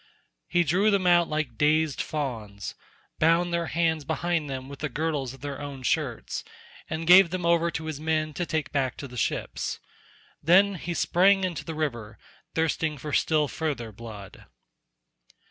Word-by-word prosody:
He 175 - +3
drew 185 +7 +3
them 200 -3 +2
out 175 -1 +5
like 150 -7 -3
dazed 155 -1 +2
fawns, 115 -9 -4 0.5
bound 170 +2 +3
their 170 -1 0
hands 160 -2 0
behind 160 0 -1
them 130 -1 -5
with 140 0 -9
the 150 - -2
girdles 145 -2 -2
of 135 - -19
their 140 0 -5
own 140 -2 -7
shirts, - - -1 0.5
and 160 +1 -3
gave 180 +1 +8
them 180 0 -3
over 170 0 +3
to 160 -1 -5
his 155 -2 -4
men 155 0 0
to 175 +3 -3
take 155 -3 -2
back 130 -4 -1
to 140 - -6
the 125 - -12
ships. 120 - -2 0.6
Then 190 +6 +5
he 175 -1 -4
sprang 195 +4 +4
into 180 -3 -2
the 160 - -6
river, 120 -9 -3 0.4
thirsting 160 -1 0
for 145 +2 -6
still 155 0 +2
further 140 -8 -3
blood. 105 -3 -11
155 Hz, 165 wpm, -27 LUFS, 140-170 Hz, 0.6 s, gave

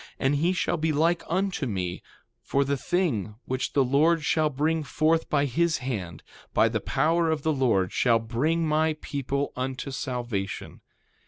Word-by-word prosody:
And 140 +2 +1
he 170 +5 +2
shall 180 -1 0
be 160 0 0
like 165 +4 +2
unto 185 -4 0
me; 90 -5 -3 0.4
for 140 0 0
the 140 +1 0
thing, 135 - -1
which 130 0 -2
the 140 - +4
Lord 155 +5 +3
shall 155 -1 +2
bring 155 +4 0
forth 155 +2 +1
by 145 -1 +2
his 165 +5 +1
hand, 95 - -5 0.3
by - - +5
the - - -2
power 165 +4 +1
of 155 -2 -1
the 160 - +2
Lord 115 -9 +1
shall 120 -2 +3
bring 140 +9 0
my 155 0 +1
people 140 0 -3
unto 130 +2 -4
salvation. 120 -7 -4
140 Hz, 165 wpm, -26 LUFS, 125-160 Hz, 0.4 s, by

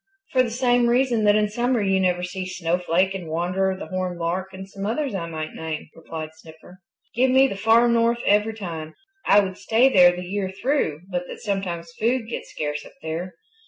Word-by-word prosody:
"For 260 - +4
the 250 - 0
same 245 0 +2
reason 240 -2 +2
that 205 0 +5
in 210 0 +3
summer 240 +3 0
you 195 -2 +2
never 180 -1 +1
see 185 +1 -4
Snowflake 180 +1 0
and 185 -4 -6
Wanderer 185 +4 0
the - - -7
Horned 185 -1 -3
Lark 175 +3 -2
and 190 0 -9
some 195 0 -8
others 245 +6 -1
I 170 -4 -3
might 155 -1 -5
name," 160 -1 -6
replied 160 -1 -7
Snipper. 160 +3 -16 0.3
"Give 255 +2 +3
me 265 +1 +6
the 230 - -5
Far 225 +4 +4
North 235 0 +3
every 210 +2 +3
time. 165 -6 -6 0.3
I 205 - +7
would 190 -1 -5
stay 235 +4 +4
there 180 -7 +6
the 180 0 -6
year 190 +1 -2
through 240 - 0
but 180 0 -2
that - - -9
sometimes 180 -5 -3
food 235 +1 +1
gets 235 - -6
scarce 150 -1 -4
up - - -14
there. 165 +3 -4
190 Hz, 200 wpm, -23 LUFS, 175-225 Hz, 0.3 s, I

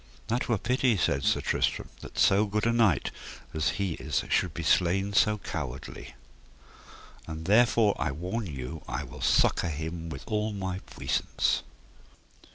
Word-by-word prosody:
That 120 +3 0
were 115 - +3
pity, 125 +1 +2
said 70 -6 +1
Sir - - +2
Tristram, - - 0
that - - -11
so 100 +2 +4
good 105 +2 -1
a 115 - +3
knight 110 - +3 0.4
as 80 -1 +1
he 100 -3 0
is - - -2
should 90 - +2
be 85 +2 -5
slain 95 +4 +2
so 105 +1 +4
cowardly; 65 - -6 1.1
and 80 0 -6
therefore 110 0 +4
I - - 0
warn 90 +9 -3
you 70 +1 -6
I - - -3
will - - -10
succour 85 - +3
him 80 +2 -4
with 80 - -7
all 105 0 -1
my 95 -2 -3
puissance. - - 0
95 Hz, 155 wpm, -28 LUFS, 80-105 Hz, 1.1 s, so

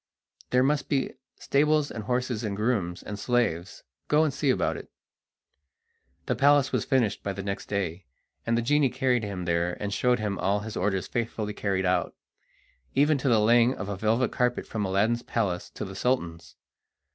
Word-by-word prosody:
There 125 0 +3
must 145 +1 0
be 135 -3 0 0.2
stables 150 +1 +2
and 110 -3 -6
horses 125 -1 -1
and 105 -3 -2
grooms 100 -5 -1
and 105 -1 -6
slaves; 105 -8 -1 0.2
go 150 +1 +4
and 150 -4 0
see 140 0 0
about 130 - +1
it!" - - -9 1.4
The - - 0
palace 145 -1 +4
was - - 0
finished 120 -7 +1
by 100 - -3
next 100 +1 -5
day, 95 -4 -3 0.4
and 115 0 +1
the 120 - 0
genie 145 +2 +3
carried 125 -2 +1
him 95 -4 -4
there 85 0 0
and 100 -1 -3
showed 125 +3 +2
him 105 -2 -3
all 100 +2 +1
his 110 +1 -7
orders 95 0 0
faithfully 110 -3 -3
carried 95 -2 -1
out, 90 -1 0 0.8
even 145 +1 +3
to 135 - 0
the 115 - +5
laying 120 +3 +4
of 95 +2 -5
a 100 - -2
velvet 110 +5 +1
carpet 125 0 0
from 105 -2 -3
Aladdin's 105 +5 +1
palace 100 -8 -2
to - - -6
the 95 0 -8
Sultan's. 85 -8 -2
110 Hz, 180 wpm, -27 LUFS, 100-125 Hz, 1.4 s, the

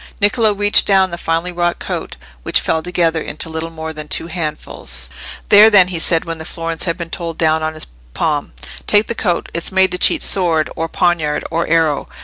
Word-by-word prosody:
Niccolò 215 0 +2
reached 205 0 +3
down 190 -2 +3
the 170 - -5
finely 165 +2 -1
wrought 175 0 -1
coat, - - -5 0.3
which - - +1
fell 160 - -1
together 170 -1 0
into 155 +2 -4
little 160 +1 -4
more 160 -1 -7
than 150 -1 -8
two - - 0
handfuls. 150 - -4 0.4
"There, 210 +2 +8
then," 195 -4 +5
he 175 -3 0
said, 165 0 +3
when 165 -1 -5
the - - -6
florins 165 +1 -3
had 170 -1 -1
been 170 -2 -7
told 165 -2 -5
down 160 -1 +2
on 155 0 -3
his - - -1 0.3
palm. - - -1 0.3
"Take 205 +1 +4
the 235 - -3
coat. 180 -6 -2
It's 170 +2 0
made 190 -1 +3
to 180 - -3
cheat - - +3
sword, 165 -5 +2
or 165 0 -3
poniard, 160 -4 0
or 165 +1 -1
arrow. 160 -2 +1
165 Hz, 205 wpm, -17 LUFS, 160-180 Hz, 0.4 s, There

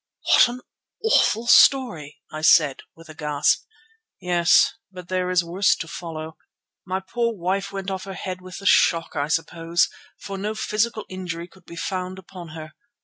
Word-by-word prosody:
"What - - +6
an 245 +1 -7 0.4
awful 235 - +3
story!" 165 - +4
I 155 - -6
said 150 -3 +5 0.2
with 165 0 -15
a 155 - -10
gasp. 150 -1 +1 0.5
"Yes, 175 -1 +4 0.2
but 180 -2 -11
there 185 -1 -1
is 180 -1 +2
worse 180 +4 +2
to 165 - -6
follow. 160 -2 -7 0.5
My 190 +1 -2
poor 235 +4 -2
wife 195 +2 -2
went 195 0 -4
off 190 0 -4
her 195 -1 -7
head, 185 0 -6
with 185 0 -9
the 200 - -10
shock 165 -3 +3
I 145 - -1
suppose, 165 +1 0 0.3
for 195 -1 -7
no 210 +2 -3
physical 215 +1 -1
injury 175 -2 -6
could 190 +1 -22
be 170 - -10
found 185 +1 -4
upon 185 -2 -11
her. 155 -1 -9
180 Hz, 170 wpm, -23 LUFS, 165-195 Hz, 0.5 s, What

